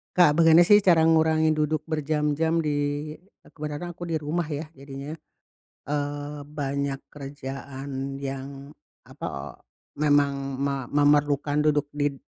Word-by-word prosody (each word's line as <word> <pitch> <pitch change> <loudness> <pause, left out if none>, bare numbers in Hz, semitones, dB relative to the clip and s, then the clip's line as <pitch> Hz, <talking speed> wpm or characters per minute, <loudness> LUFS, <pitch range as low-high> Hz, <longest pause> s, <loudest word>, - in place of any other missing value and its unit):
Kak 175 -5 +6
bagaimana 165 0 +6
sih 205 -1 +7
cara 165 -4 +5
ngurangi 160 -1 +3
duduk 155 +1 -1
berjam-jam 155 +1 0
di 155 -2 0 0.8
kebetulan 155 +3 -6
aku 175 - -8
di 160 - 0
rumah 155 +4 -1
ya 150 0 -5
jadinya, 140 +2 -8 0.7
eee, 145 0 -3
banyak 140 -2 -2 0.2
kerjaan 135 -1 -6
yang, 135 +1 -7 0.3
apa - - -6 0.4
memang 140 -2 +1
ma 140 -2 -2
memerlukan 145 0 +2
duduk 150 -1 +2
di 145 -1 -1
145 Hz, 115 wpm, -25 LUFS, 140-155 Hz, 0.8 s, sih